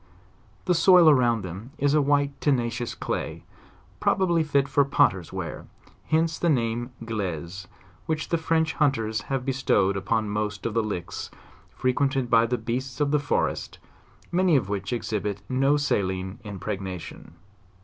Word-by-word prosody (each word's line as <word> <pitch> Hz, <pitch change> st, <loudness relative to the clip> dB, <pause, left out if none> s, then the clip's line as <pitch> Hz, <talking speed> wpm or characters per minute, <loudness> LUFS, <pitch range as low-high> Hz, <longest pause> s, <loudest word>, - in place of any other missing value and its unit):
The 180 Hz, -, +3 dB
soil 175 Hz, 0 st, +6 dB
around 120 Hz, -7 st, +4 dB
them 95 Hz, +9 st, -8 dB
is 145 Hz, 0 st, +2 dB
a 150 Hz, -, +4 dB
white, 145 Hz, 0 st, +2 dB
tenacious 120 Hz, -4 st, 0 dB
clay, -, -, -4 dB, 0.6 s
probably 175 Hz, -4 st, +2 dB
fit 140 Hz, -2 st, +1 dB
for 140 Hz, 0 st, +3 dB
potters* 95 Hz, -, +2 dB
ware: -, -, -6 dB, 0.4 s
hence 160 Hz, 0 st, +1 dB
the 170 Hz, -, +1 dB
name 120 Hz, -3 st, 0 dB
of 115 Hz, -, -9 dB
'glaise,' 95 Hz, -4 st, -4 dB, 0.4 s
which 155 Hz, -1 st, -2 dB
the 170 Hz, -, +1 dB
French 160 Hz, 0 st, +1 dB
hunters 115 Hz, -8 st, +1 dB
have 135 Hz, -2 st, -1 dB
bestow 125 Hz, -8 st, +2 dB
ed -, -, -4 dB
upon 110 Hz, +3 st, 0 dB
most 105 Hz, 0 st, -3 dB
of 115 Hz, -, -1 dB
the 115 Hz, -, +2 dB
licks, 90 Hz, -6 st, -5 dB, 0.4 s
frequented 130 Hz, 0 st, 0 dB
by 115 Hz, 0 st, +5 dB
the 125 Hz, +1 st, 0 dB
beasts 130 Hz, +3 st, -4 dB
of 145 Hz, -1 st, +1 dB
the 150 Hz, -, +3 dB
forest, 145 Hz, +1 st, -1 dB, 0.5 s
many 180 Hz, -2 st, +3 dB
of 115 Hz, -8 st, +1 dB
which 100 Hz, -1 st, -3 dB
exhibit 105 Hz, -4 st, -3 dB
no 135 Hz, +4 st, +2 dB
saline 95 Hz, -7 st, -1 dB
impregnation. 95 Hz, -3 st, -6 dB
120 Hz, 150 wpm, -25 LUFS, 105-145 Hz, 0.6 s, soil